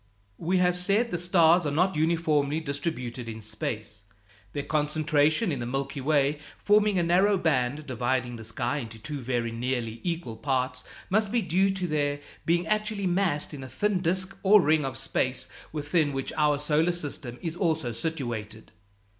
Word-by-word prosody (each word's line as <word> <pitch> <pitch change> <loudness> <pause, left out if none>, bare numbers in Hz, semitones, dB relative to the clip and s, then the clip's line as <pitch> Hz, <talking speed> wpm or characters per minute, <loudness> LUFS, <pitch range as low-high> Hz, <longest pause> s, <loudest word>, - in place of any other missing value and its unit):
We 180 +3 +1
have 180 0 +2
said 205 +6 +2
the 175 - -1
stars 175 -1 +4
are - - -1
not 180 +5 +2
uniformly 155 -2 +1
distributed 130 -6 -4
in 110 0 -6
space. 110 0 -5 0.5
Their 145 - -3
concentration 150 +4 +1
in 140 - -2
the 120 - -3
Milky 135 +2 -3
Way, 145 0 +2 0.2
forming 210 -1 +3
a 175 - +3
narrow 190 +4 +4
band 145 -3 0
dividing 125 -1 -1
the 110 - -9
sky 120 +5 -2
into 115 -5 -6
two 145 +5 -6
very 120 -2 -1
nearly 115 -1 -2
equal 165 -10 -3
parts, 130 0 -1 0.3
must 210 0 +2
be 235 -2 +1
due 185 +3 +2
to 190 -1 -2
their 145 -2 0 0.3
being 170 +1 +2
actually 215 +1 0
massed 175 -5 +1
in 135 -2 -7
a - - -7
thin 205 - 0
disk 185 +2 0
or 205 +2 +7
ring 155 -4 +3
of 135 - -4
space - - -1 0.2
within 150 0 0
which 135 0 -3
our 150 -2 +3
solar 150 +4 +2
system 145 -7 -5
is 165 -1 -2
also 160 -8 0
situated. 115 -7 -4
150 Hz, 170 wpm, -27 LUFS, 130-175 Hz, 0.5 s, or